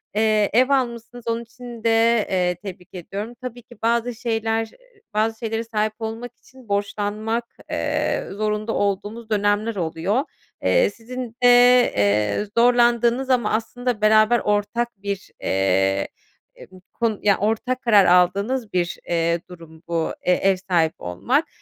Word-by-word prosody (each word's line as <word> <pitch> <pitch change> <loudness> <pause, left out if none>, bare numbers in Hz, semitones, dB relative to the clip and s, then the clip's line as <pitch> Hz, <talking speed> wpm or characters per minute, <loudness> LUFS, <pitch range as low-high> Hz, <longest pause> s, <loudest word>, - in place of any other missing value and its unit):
Eee, 215 -1 +2
ev 255 +3 +4
almışsınız 240 -3 -2
onun 230 0 -1
için 235 0 -11
de 230 - +3 0.4
eee, 180 -1 +1
tebrik 180 -1 -10
ediyorum. 200 +6 -6
Tabii 245 -1 -7
ki 240 -3 -17
bazı 235 +1 +1
şeyler, 225 -1 -1
ııı, - - -25
bazı 220 +1 0
şeylere 225 -1 -2
sahip 215 -1 -1
olmak 230 +2 -5
için 255 -4 -19
borçlanmak, 210 +3 -2 0.3
eee, - - -1
zorunda 215 +2 -2
olduğumuz 205 +3 -2
dönemler 205 +1 +1
oluyor. 175 - -1 0.4
Eee, - - +3
sizin 240 0 -8
de, - - +7 0.5
eee, 105 - +1
zorlandığınız 240 +1 +3
ama 250 -2 +2
aslında 230 0 -2
beraber 215 +2 +5
ortak 210 +3 0
bir, 200 -1 -5
eee, 95 0 +1 0.5
e - - -14
bu 185 -1 -15
konu 225 -3 -1
Ya, 200 -2 +4
ortak 225 +5 -1
karar 210 -5 +5
aldığınız 200 +7 +2
bir, 175 -1 -1
eee, 170 0 +1
durum 165 -2 -13
bu, 165 -1 -1
eee, 180 - +4
ev 195 +1 +2
sahibi 175 -4 0
olmak. 90 0 -1
215 Hz, 140 wpm, -22 LUFS, 190-235 Hz, 0.5 s, de